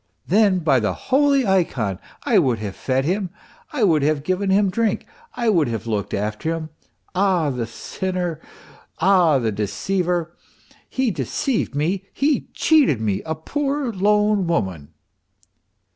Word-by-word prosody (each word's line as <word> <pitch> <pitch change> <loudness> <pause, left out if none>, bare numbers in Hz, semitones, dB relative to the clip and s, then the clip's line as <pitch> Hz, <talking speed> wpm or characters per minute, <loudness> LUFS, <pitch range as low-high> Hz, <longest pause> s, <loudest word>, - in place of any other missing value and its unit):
n, 200 -1 +4
by 150 -7 +3
the 105 -5 -1
holy 275 -1 +2
ikon 130 - 0 0.2
I - - +4
would 125 -4 +2
have 105 -3 -5
fed 130 0 -1
him, 185 +3 -1 0.4
I 285 -7 -1
would 160 -7 +4
have 145 0 +1
given 185 +4 -1
him 195 0 +3
drink, 225 0 0 0.3
I 240 -2 -1
would 170 -9 +3
have 115 -2 -4
looked 105 -3 -2
after 105 +11 -2
him. 155 -1 -6 0.4
Ah, 185 -6 +2
the 120 -3 -3
sinner! 180 +6 -4 0.6
ah, 175 -4 +4
the 115 -4 0
deceiver! 170 - -1 0.5
He 260 -3 0
deceived 170 - -2
me, 180 +7 -1
he 285 +1 +1
cheated 295 - +4
me, 105 -2 -1
a 160 - -1
poor 275 - -2
lone 210 0 +2
woman 90 - -2
175 Hz, 145 wpm, -22 LUFS, 130-205 Hz, 0.6 s, n